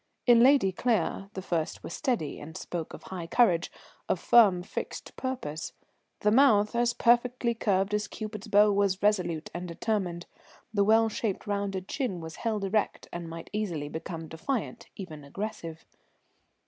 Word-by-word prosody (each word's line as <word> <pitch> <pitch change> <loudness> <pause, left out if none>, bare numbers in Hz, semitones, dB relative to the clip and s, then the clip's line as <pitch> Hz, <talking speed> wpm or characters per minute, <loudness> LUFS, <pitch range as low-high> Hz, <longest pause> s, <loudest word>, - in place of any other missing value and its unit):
In 240 -2 +7
Lady 250 -5 +5
Claire 195 -2 0
the 190 - -5
first 165 -4 -2
were - - -7
steady 240 - -2
and 160 +2 -8
spoke 170 -3 -5
of - - -13
high 175 -3 -6
courage, 175 -4 +3 0.4
of 180 - +1
firm, 195 -6 +5
fixed - - -6
purpose; 245 - -4 0.5
the 210 - +3
mouth, 215 -4 +5
as 240 0 +2
perfectly 240 0 +2
curved 200 -3 0
as 210 0 0
Cupid's 215 0 -7
bow, 210 0 +5
was 200 -1 +1
resolute 180 -6 +1
and 175 +2 -5
determined, 175 -1 -2 0.5
the 200 -1 +3
well 225 +2 +5
shaped, 215 -2 -3
rounded 200 -2 -2
chin 250 -11 -2
was 160 -1 -8
held 220 -3 -2
erect, 210 +2 -1
and 170 -1 -5
might 165 0 -8
easily 175 -9 -2
become 160 +1 -6
defiant, 210 - -4
even 160 -7 -8
aggressive. 165 0 -6
200 Hz, 155 wpm, -28 LUFS, 170-225 Hz, 0.5 s, In